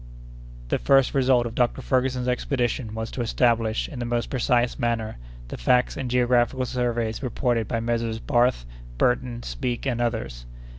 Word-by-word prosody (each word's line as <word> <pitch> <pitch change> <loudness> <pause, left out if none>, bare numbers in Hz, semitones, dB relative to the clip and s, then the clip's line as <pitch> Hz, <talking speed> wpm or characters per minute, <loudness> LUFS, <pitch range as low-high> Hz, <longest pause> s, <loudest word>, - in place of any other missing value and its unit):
The - - +1
first 135 -1 +4
result 130 -3 +3
of 115 - -4
Dr. 125 +2 0
Ferguson's 130 -1 0
expedition 125 -2 -1
was 110 0 -4
to 125 - -4
establish, 115 -1 +1
in 130 - -8
the 120 - -2
most 120 0 -2
precise 125 -1 +1
manner, 115 -3 -1 0.3
the - - -6
facts 125 - +2
and 135 -3 -4
geographical 125 +1 +2
surveys 120 -3 -1
reported 120 -3 0
by 115 -2 -1
Messrs. 115 -1 -1
Barth, 120 - +1 0.3
Burton, 120 - 0
Speke, 125 -2 -3
and 120 -3 -1
others. 65 - -3
120 Hz, 155 wpm, -24 LUFS, 115-125 Hz, 0.3 s, first